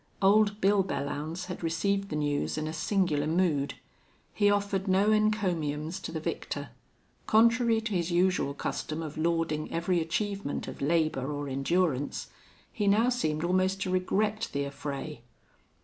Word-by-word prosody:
Old 205 Hz, +1 st, +4 dB
Bill 195 Hz, 0 st, +4 dB
Belllounds 155 Hz, +1 st, -3 dB
had 180 Hz, 0 st, -6 dB
received 195 Hz, +5 st, 0 dB
the -, -, -3 dB
news 145 Hz, 0 st, -1 dB
in 155 Hz, 0 st, -2 dB
a 155 Hz, -, -4 dB
singular 160 Hz, -3 st, +1 dB
mood; 160 Hz, -4 st, +1 dB, 0.6 s
he 205 Hz, -1 st, +3 dB
offered 200 Hz, -1 st, 0 dB
no 195 Hz, +3 st, +3 dB
encomiums 180 Hz, -7 st, 0 dB
to 175 Hz, -, -6 dB
the 160 Hz, -, -3 dB
victor; 155 Hz, -, -4 dB, 0.6 s
contrary 230 Hz, +1 st, +4 dB
to 220 Hz, 0 st, -4 dB
his 175 Hz, -2 st, 0 dB
usual 175 Hz, -5 st, +1 dB
custom 155 Hz, +2 st, -3 dB
of 155 Hz, -2 st, -6 dB
lauding 165 Hz, -1 st, -1 dB
every 170 Hz, +1 st, +1 dB
achievement 200 Hz, +1 st, -2 dB
of -, -, -8 dB
labor 150 Hz, -2 st, +1 dB
or 145 Hz, 0 st, -4 dB
endurance, 140 Hz, +1 st, 0 dB, 0.4 s
he 205 Hz, -2 st, -1 dB
now 220 Hz, +5 st, +4 dB
seemed 155 Hz, -11 st, -1 dB
almost 185 Hz, +2 st, +1 dB
to 185 Hz, -, -1 dB
regret 205 Hz, +4 st, 0 dB
the 140 Hz, 0 st, -1 dB
affray. 140 Hz, -1 st, -6 dB
175 Hz, 150 wpm, -29 LUFS, 155-200 Hz, 0.6 s, Old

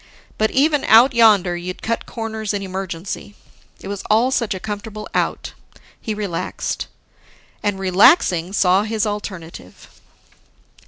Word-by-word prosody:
But 220 Hz, 0 st, +2 dB
even 295 Hz, +1 st, +2 dB
Out 235 Hz, +5 st, +6 dB
Yonder, 205 Hz, -6 st, +4 dB
you'd 180 Hz, +1 st, -7 dB
cut 230 Hz, +1 st, -2 dB
corners 220 Hz, -2 st, -4 dB
in 200 Hz, -, -3 dB
emergency. 190 Hz, +1 st, -6 dB, 0.5 s
It -, -, -9 dB
was 200 Hz, -1 st, -5 dB
all 230 Hz, +5 st, +3 dB
such 230 Hz, -6 st, 0 dB
a -, -, -5 dB
comfortable 210 Hz, +1 st, -6 dB
Out, -, -, -2 dB, 0.5 s
he 220 Hz, -, -3 dB
relaxed. 200 Hz, -5 st, -4 dB, 0.7 s
And, 205 Hz, -2 st, -1 dB
relaxing, 185 Hz, -, +4 dB
saw 190 Hz, -1 st, +3 dB
his 220 Hz, 0 st, -1 dB
alternative. 185 Hz, -, -7 dB
205 Hz, 125 wpm, -20 LUFS, 185-220 Hz, 0.7 s, Out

